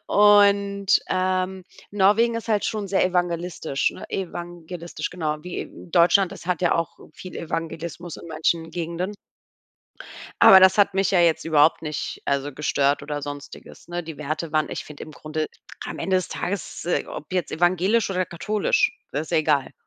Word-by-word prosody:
Und, 200 Hz, -1 st, +4 dB
ähm, 185 Hz, 0 st, -1 dB, 0.3 s
Norwegen 210 Hz, +4 st, +3 dB
ist 230 Hz, -, -6 dB
halt 210 Hz, -2 st, +1 dB
schon 210 Hz, -2 st, -2 dB
sehr 195 Hz, -, +2 dB
evangelistisch 175 Hz, -4 st, -1 dB
ne -, -, -10 dB
evangelistisch, 175 Hz, -3 st, -6 dB
genau. 155 Hz, -4 st, -2 dB
Wie 180 Hz, +1 st, -5 dB, 0.2 s
Deutschland, 175 Hz, +2 st, +4 dB
das -, -, -11 dB
hat 180 Hz, 0 st, -1 dB
ja 175 Hz, -, +3 dB
auch 165 Hz, -1 st, -3 dB
viel 185 Hz, +3 st, -10 dB
Evangelismus 165 Hz, +1 st, -5 dB
in -, -, -11 dB
manchen 160 Hz, +1 st, -1 dB
Gegenden. 175 Hz, +4 st, -4 dB, 1.3 s
Aber 190 Hz, -, +10 dB
das 190 Hz, +2 st, +6 dB
hat 200 Hz, -1 st, +4 dB
mich 195 Hz, 0 st, +2 dB
ja 185 Hz, -, +4 dB
jetzt 170 Hz, -2 st, +3 dB
überhaupt 160 Hz, 0 st, +4 dB
nicht, 150 Hz, -2 st, -4 dB
also, 140 Hz, +1 st, -1 dB
gestört 140 Hz, 0 st, +1 dB
oder 145 Hz, 0 st, -4 dB
Sonstiges. 145 Hz, +3 st, -9 dB
Ne, 175 Hz, 0 st, -3 dB
die 160 Hz, -2 st, -8 dB
Werte 155 Hz, +2 st, -4 dB
waren 155 Hz, -1 st, +1 dB
ich -, -, -5 dB
finde 150 Hz, -1 st, -9 dB
im 155 Hz, -, -12 dB
Grunde 155 Hz, +1 st, -4 dB, 0.4 s
am -, -, -6 dB
Ende 190 Hz, -1 st, +1 dB
des 185 Hz, -, -1 dB
Tages, 190 Hz, -3 st, -4 dB
äh, 175 Hz, -, 0 dB
ob 155 Hz, -, -8 dB
jetzt 180 Hz, -2 st, -1 dB
evangelisch 185 Hz, +6 st, +2 dB
oder 185 Hz, -1 st, 0 dB
katholisch, 215 Hz, -, 0 dB, 0.2 s
das -, -, -1 dB
ist 160 Hz, -, -10 dB
ja 165 Hz, -, +4 dB
egal. 150 Hz, -4 st, +1 dB
175 Hz, 170 wpm, -24 LUFS, 155-190 Hz, 1.3 s, Aber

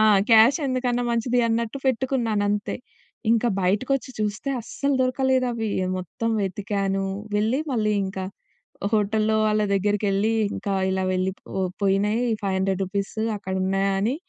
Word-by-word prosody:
ఆ! 215 Hz, -, +5 dB, 0.3 s
క్యాష్ 230 Hz, +6 st, +7 dB
ఎందుకన్నా 250 Hz, -1 st, 0 dB
మంచిది 235 Hz, +1 st, +1 dB
అన్నట్టు 230 Hz, +3 st, -1 dB
పెట్టుకున్నానంతే. 225 Hz, -5 st, 0 dB, 0.5 s
ఇంకా 235 Hz, +1 st, +3 dB
బయటకొచ్చి 255 Hz, +8 st, 0 dB
చూస్తే 215 Hz, +5 st, -2 dB
అస్సలు 280 Hz, +5 st, -2 dB
దొరకలేదు 260 Hz, 0 st, +2 dB
అవి 225 Hz, -2 st, -2 dB, 0.3 s
మొత్తం 225 Hz, +6 st, -3 dB
వెతికాను, 195 Hz, 0 st, -1 dB, 0.3 s
వెళ్ళి 220 Hz, +5 st, +1 dB
మళ్ళీ 215 Hz, -3 st, +1 dB
ఇంక 190 Hz, 0 st, -5 dB, 0.7 s
హోటల్లో 215 Hz, +1 st, +2 dB
వాళ్ళ 215 Hz, 0 st, +2 dB
దగ్గరికేళ్లి 205 Hz, +1 st, +1 dB, 0.2 s
ఇంకా 200 Hz, -, -3 dB, 0.2 s
ఇలా 190 Hz, 0 st, 0 dB
వెళ్ళి 185 Hz, +1 st, 0 dB, 0.2 s
పో 190 Hz, -, -3 dB, 0.2 s
పోయినాయి 205 Hz, +4 st, +2 dB, 0.2 s
500 190 Hz, -1 st, 0 dB
రూపీసు 200 Hz, +3 st, -3 dB, 0.2 s
అక్కడ 190 Hz, -2 st, -5 dB
ఉన్నాయా 195 Hz, +1 st, +1 dB
అని 225 Hz, +6 st, +1 dB
215 Hz, 125 wpm, -24 LUFS, 195-240 Hz, 0.7 s, క్యాష్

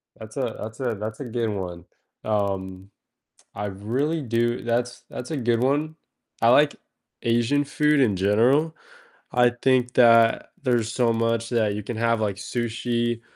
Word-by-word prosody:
That's -, -, -11 dB
a -, -, -2 dB
that's 110 Hz, +2 st, -7 dB
a 120 Hz, -4 st, -1 dB
that's 105 Hz, +1 st, -6 dB
a 140 Hz, -, -5 dB
good 115 Hz, -1 st, -2 dB
one. 90 Hz, -4 st, -5 dB, 0.4 s
Um, 95 Hz, -2 st, -2 dB, 0.7 s
I 105 Hz, -, -3 dB
really 125 Hz, +11 st, -2 dB
do 120 Hz, 0 st, -1 dB
that's 120 Hz, +1 st, -2 dB
that's 125 Hz, +6 st, -7 dB
a 155 Hz, -, -2 dB
good 120 Hz, -1 st, +1 dB
one, 150 Hz, +4 st, 0 dB, 0.5 s
I -, -, +5 dB
like -, -, +5 dB, 0.5 s
Asian 120 Hz, +5 st, +2 dB
food 150 Hz, 0 st, +2 dB
in 110 Hz, -7 st, +3 dB
general. 120 Hz, -, +2 dB, 0.6 s
I 125 Hz, -1 st, +4 dB
think 130 Hz, -1 st, +2 dB
that 115 Hz, -2 st, +5 dB
there's 120 Hz, -3 st, +1 dB
so 120 Hz, -2 st, +2 dB
much 115 Hz, 0 st, 0 dB
that 110 Hz, -4 st, +1 dB
you 105 Hz, -, -4 dB
can 115 Hz, +1 st, -5 dB
have, 115 Hz, -1 st, +1 dB
like, 100 Hz, -3 st, -1 dB
sushi, 120 Hz, +1 st, -2 dB
115 Hz, 155 wpm, -24 LUFS, 110-125 Hz, 0.7 s, I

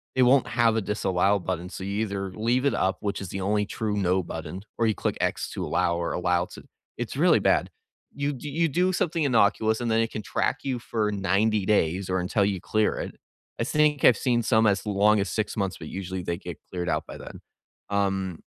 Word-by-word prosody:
it 130 Hz, -, +4 dB
won't 130 Hz, +1 st, +4 dB
have 115 Hz, -1 st, +2 dB
a 110 Hz, -, +1 dB
disallow 100 Hz, -1 st, +1 dB
button, 90 Hz, -1 st, -3 dB
so 95 Hz, -, -7 dB
you 100 Hz, +2 st, -2 dB
either 100 Hz, -3 st, -3 dB
leave 120 Hz, +6 st, 0 dB
it 140 Hz, -, +3 dB
up, 95 Hz, +1 st, 0 dB
which 100 Hz, -2 st, -2 dB
is 95 Hz, -, -5 dB
the 95 Hz, +2 st, -4 dB
only 105 Hz, +2 st, +1 dB
true 105 Hz, 0 st, -3 dB
"no" 95 Hz, -1 st, +1 dB
button, 80 Hz, +2 st, -6 dB, 0.2 s
or 115 Hz, -, +2 dB
you 110 Hz, -, +1 dB
click -, -, -2 dB
x -, -, -1 dB
to -, -, -4 dB
allow 85 Hz, -, +1 dB
or 85 Hz, -, -2 dB
allow 90 Hz, 0 st, +1 dB
to -, -, -12 dB, 0.3 s
it's -, -, -4 dB
really -, -, +5 dB
bad. -, -, +2 dB, 0.4 s
You 140 Hz, 0 st, -2 dB
d 145 Hz, +3 st, -7 dB
you 165 Hz, +4 st, +1 dB
do 180 Hz, +6 st, +2 dB
something 170 Hz, -2 st, 0 dB
innocuous, 110 Hz, -3 st, +3 dB
and 120 Hz, -, -1 dB
then 110 Hz, -, +3 dB
it 115 Hz, -, -1 dB
can 110 Hz, -, -4 dB
track 135 Hz, -, 0 dB
you 130 Hz, -3 st, -2 dB
for 110 Hz, -2 st, -1 dB
90 100 Hz, +1 st, +1 dB
days, 95 Hz, -2 st, +1 dB
or 95 Hz, 0 st, +1 dB
until 100 Hz, +3 st, +1 dB
you 100 Hz, -3 st, -1 dB
clear 110 Hz, -1 st, +1 dB
it. -, -, -5 dB, 0.4 s
I -, -, +1 dB
think 150 Hz, -2 st, +2 dB
I've 125 Hz, -, +7 dB
seen 120 Hz, -3 st, +1 dB
some 110 Hz, -1 st, +3 dB
as 100 Hz, +1 st, +1 dB
long 105 Hz, +1 st, +3 dB
as 100 Hz, -, -1 dB
6 110 Hz, -1 st, -2 dB
months, 95 Hz, -3 st, -1 dB
but 80 Hz, -, -8 dB
usually 95 Hz, -1 st, -4 dB
they 85 Hz, 0 st, -2 dB
get 90 Hz, -4 st, -8 dB
cleared 90 Hz, -1 st, -3 dB
out -, -, -1 dB
by -, -, -8 dB
then. -, -, -10 dB, 0.5 s
Um 95 Hz, -3 st, -1 dB
105 Hz, 225 wpm, -26 LUFS, 95-115 Hz, 0.5 s, I've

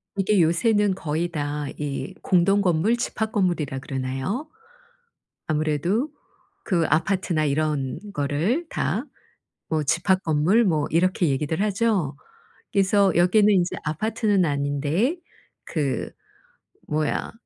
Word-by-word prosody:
이게 195 Hz, 0 st, +2 dB
요새는 200 Hz, +4 st, +2 dB
거의 160 Hz, 0 st, -2 dB
다 145 Hz, -2 st, -3 dB
이 140 Hz, -2 st, -4 dB
공동 195 Hz, +2 st, +3 dB
건물 185 Hz, +5 st, +2 dB
집합 220 Hz, -2 st, -2 dB
건물이라 175 Hz, -, 0 dB
그러나요? 135 Hz, -, -3 dB, 1.0 s
아무래도 155 Hz, -, 0 dB, 0.5 s
그 170 Hz, -5 st, +1 dB
아파트나 165 Hz, 0 st, +1 dB
이런 145 Hz, -2 st, -1 dB
거를 160 Hz, -, 0 dB
다 -, -, -1 dB, 0.6 s
뭐 160 Hz, -1 st, +1 dB
집합 175 Hz, +6 st, +1 dB
건물 165 Hz, +9 st, +3 dB
뭐 155 Hz, -6 st, +1 dB
이렇게 180 Hz, +1 st, +2 dB
얘기들 150 Hz, +4 st, -1 dB
하죠? 205 Hz, -, 0 dB, 0.6 s
그래서 200 Hz, -1 st, +3 dB
여기는 185 Hz, +5 st, +4 dB
인제 180 Hz, -1 st, +1 dB
아파트는 205 Hz, +4 st, +1 dB
아닌데 145 Hz, -, 0 dB, 0.5 s
그 145 Hz, -5 st, -2 dB, 0.8 s
뭐야 150 Hz, 0 st, -1 dB
170 Hz, 235 characters per minute, -24 LUFS, 150-200 Hz, 1.0 s, 여기는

